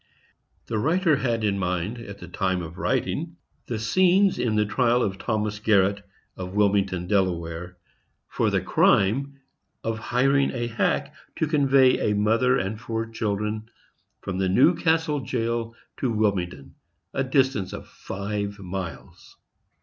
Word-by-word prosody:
The 110 - -2
writer 160 - +2
had 115 -4 -1
in 100 -2 +1
mind, 90 +5 -2
at 100 -4 -9
the 90 - -10
time 95 0 -1
of 85 +2 -9
writing, - - -1 0.3
the 115 - -2
scenes 185 - +3
in 115 -3 0
the 105 0 +3
trial 120 +3 +2
of 95 -2 -2
Thomas 105 -1 -2
Garret, 100 -1 +2 0.3
of 90 +1 -7
Wilmington, 100 -3 +2
Delaware, 90 -2 -1 0.5
for - - 0
the - - +1
crime 135 +8 +2 0.4
of 115 0 -2
hiring 135 +4 +2
a 120 -2 -2
hack 115 -1 -1 0.2
to - - 0
convey 135 -6 +3
a 105 - +1
mother 115 +5 +3
and 100 +4 -3
four 115 -1 -3
children 110 0 -2 0.5
from 95 -1 -4
Newcastle 155 - +3
jail 115 -2 -2 0.2
to 130 - -1
Wilmington, 95 -10 -1 0.4
a 135 - 0
distance 130 -7 +1
of - - -8
five 100 +1 -5
miles. 95 -3 -8
110 Hz, 135 wpm, -25 LUFS, 95-125 Hz, 0.5 s, scenes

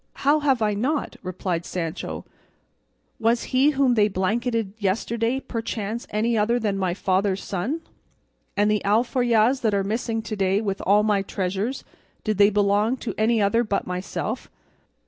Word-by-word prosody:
"How 295 +2 +5
have 270 -6 +2
I 210 -1 +2
not?" 270 +9 -1
replied 185 -2 -3
Sancho; 170 -1 -4 0.9
"was 230 +1 +2
he 265 +3 +5
whom 270 -3 +3
they 210 -3 +4
blanketed 215 +2 -1
yesterday 230 +5 0
perchance 225 -2 -4
any 225 +3 0
other 225 +3 +2
than 215 -4 -1
my 185 -2 -1
father's 190 0 0
son? 220 - -2 0.8
and 205 +1 +3
the 210 - +1
alforjas 235 +3 +2
that 220 -3 +1
are 195 - +1
missing 225 +2 -2
to 215 0 -4
day 195 0 +2
with 200 -3 -2
all 205 +2 +5
my 210 -2 +2
treasures, 195 +6 -3 0.4
did 215 -2 -1
they 200 0 +7
belong 205 +4 +2
to 245 - -4
any 220 0 +2
other 230 +4 +3
but 210 -3 -1
myself?" 185 +6 -4
215 Hz, 155 wpm, -24 LUFS, 200-235 Hz, 0.9 s, they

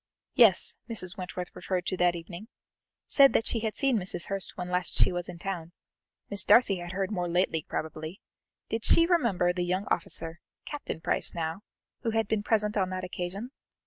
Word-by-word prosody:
Yes 225 -8 +5
Mrs. 185 -6 -2
Wentworth 180 -1 -6
referred 180 0 -2
to 185 - -2
that 175 -1 +3
evening 170 +4 -8 0.6
said 275 -1 +6
that 225 - +2
she 230 - 0
had 220 -1 -3
seen 270 -5 +2
Mrs. 180 -2 -2
Hurst 195 +1 -4
when 180 -1 -4
last 180 0 -1
she - - +5
was 175 -1 -4
in 170 - -7
town 175 -2 -5 0.5
Miss 200 -2 0
Darcy 205 -5 +5
had 175 0 -6
heard 195 +2 -2
more 180 -4 -2
lately, 170 -3 +1
probably 155 +3 -5 0.5
did 225 0 -3
she 335 - +6
remember 235 - +2
the 180 - -2
young 185 +3 -1
officer, 165 0 0 0.3
Captain 290 - -6
Price - - +1
now, 165 +2 -3 0.4
who 230 - -1
had 225 -1 0
been 220 -1 0
present 210 0 +1
on 190 -2 +1
that 185 0 -4
occasion? 185 +6 -5
185 Hz, 185 wpm, -28 LUFS, 175-215 Hz, 0.6 s, said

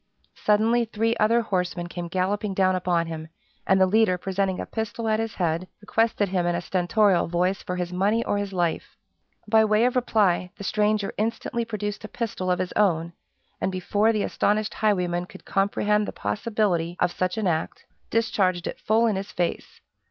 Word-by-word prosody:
Suddenly 225 +3 +2
three 225 +1 0
other 230 +3 +3
horsemen 180 -4 -2
came 175 0 -6
galloping 190 +3 -1
down 185 -1 +3
upon 175 -2 +1
him, 160 -1 -6 0.4
and 190 0 +4
the 190 - +6
leader 200 -1 +3
presenting 190 +1 -1
a - - -3
pistol 225 +1 -4
at 215 0 +2
his 225 -1 -3
head, 170 0 -1
requested 220 -1 +1
him 180 -2 0
in 175 - +1
a - - 0
stentorial 185 +2 +2
voice 180 +3 0
for 180 - -4
his 180 0 -3
money 205 +5 +1
or 205 - 0
his 200 -1 -3
life. 175 -3 -2 0.5
By 220 +1 +5
way 215 +2 +3
of 250 - +1
reply, 205 -7 +2
the - - -8
stranger 210 0 0
instantly 230 +1 -1
produced 210 -1 -4
a - - -5
pistol 220 -6 -3
of 180 - +2
his 185 0 -3
own, 170 -5 +1 0.5
and 190 - 0
before 205 +4 +1
the 215 -2 0
astonished 210 +1 0
highwayman 180 -4 0
could - - -14
comprehend 205 +1 +1
the - - -5
possibility 200 -7 -1
of 180 - +2
such 185 +3 -2
an 220 - -1
act, 160 -3 -2 0.2
discharged 190 -6 +1
it - - -5
full 225 +2 +2
in 215 -4 +1
his 195 +1 -5
face. 175 -1 -3
195 Hz, 185 wpm, -25 LUFS, 180-215 Hz, 0.5 s, the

